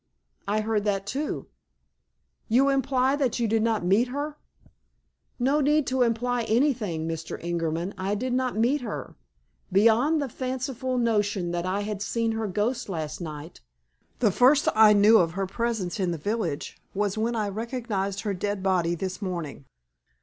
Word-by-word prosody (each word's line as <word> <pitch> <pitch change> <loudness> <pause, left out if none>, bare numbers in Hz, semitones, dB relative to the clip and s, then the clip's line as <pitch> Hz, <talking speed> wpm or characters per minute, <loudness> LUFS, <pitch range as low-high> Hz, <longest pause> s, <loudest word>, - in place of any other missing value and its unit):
"I 210 +2 +1
heard 215 -1 0
that, 195 -2 0
too." 280 +8 -3 1.0
"You 260 +5 +4
imply 270 0 +2
that 260 -4 0
you 235 - +1
did 220 +1 +2
not 220 -5 0
meet 205 +7 +3
her?" 290 +4 -4 1.0
"No 275 +4 +2
need 300 +1 +3
to 260 - +1
imply 245 +1 +1
anything, 220 - +1
Mr. 165 0 -4
Ingerman. 170 +2 -2
I 195 +2 -1
did 250 +4 -2
not 255 -3 0
meet 255 +6 +2
her. 225 -4 -6 0.6
Beyond 230 - +4
the 285 - -1
fanciful 255 0 -3
notion 205 -6 +1
that 175 +1 -2
I 195 +2 0
had 205 -1 -4
seen 230 +2 0
her 220 -1 -2
ghost 215 +5 -1
last 155 -3 -4
night, 155 0 -7 0.6
the 220 -5 +3
first 265 +8 +4
I 215 -1 +7
knew 210 +2 +6
of 165 -2 +1
her 195 +1 -1
presence 220 -1 -2
in 185 -2 +1
the 170 - -2
village 175 -3 -3 0.2
was 205 -1 0
when 230 +2 -1
I 210 -2 -1
recognized 210 -3 -3
her 210 -3 -2
dead 200 +1 -3
body 175 -3 +1
this 185 +4 -5
morning." 170 -8 -5
215 Hz, 165 wpm, -26 LUFS, 190-245 Hz, 1.0 s, I